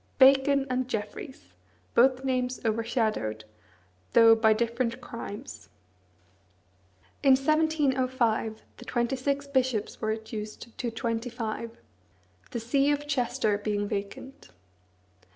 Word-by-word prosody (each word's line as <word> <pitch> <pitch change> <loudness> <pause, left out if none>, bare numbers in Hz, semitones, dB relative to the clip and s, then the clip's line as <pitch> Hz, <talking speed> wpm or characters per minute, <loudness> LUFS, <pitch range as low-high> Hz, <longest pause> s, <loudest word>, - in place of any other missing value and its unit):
Bacon 270 +1 +5
and 255 -1 -1
Jeffreys! 215 - -6 0.4
both 260 +2 +4
names 255 -1 -1
overshadowed, 220 - -1 0.7
though 230 -1 +8
by 220 -1 +4
different 235 +2 0
crimes. 240 0 -8 1.5
In 275 -2 +6
1705, 260 -6 +1
the 245 - -11
twenty 240 +2 0
six 280 +2 -1
bishops 260 -6 -1
were 220 - -1
reduced 220 +1 -5
to 245 - -1
twenty 230 +1 -3
five, 230 -1 -5 0.7
the 235 - -4
see 275 +5 +2
of 290 0 0
Chester 240 -6 0
being 205 -1 -1
vacant. 205 +7 -6
240 Hz, 105 wpm, -28 LUFS, 220-265 Hz, 1.5 s, though